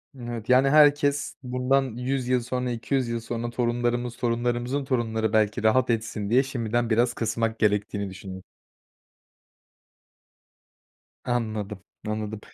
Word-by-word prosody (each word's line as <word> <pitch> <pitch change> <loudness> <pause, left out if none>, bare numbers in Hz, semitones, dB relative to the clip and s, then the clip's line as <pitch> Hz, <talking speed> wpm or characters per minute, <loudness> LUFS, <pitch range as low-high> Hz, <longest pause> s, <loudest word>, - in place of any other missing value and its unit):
Evet, 120 -3 -6
yani, 130 +2 +5
herkes 145 -1 +4
bundan 125 +2 +1
100 125 0 0
sonra, 125 +1 -2
200 125 +2 -1
yıl 115 0 -1
sonra 115 +1 -4
torunlarımız, 120 0 -1
torunlarımızın 120 +3 -1
torunları 110 -4 0
belki 110 -1 +2
rahat 125 +4 +3
etsin 110 -3 -1
diye 125 +4 +4
şimdiden 120 -3 -1
biraz 120 +2 +2
kısmak 115 0 -1
gerektiğini 105 -1 0
düşünüyorsun. 95 0 -9 2.8
Anladım. 110 -5 -3 0.2
Anladım. 110 0 -3
120 Hz, 110 wpm, -26 LUFS, 110-125 Hz, 2.8 s, yani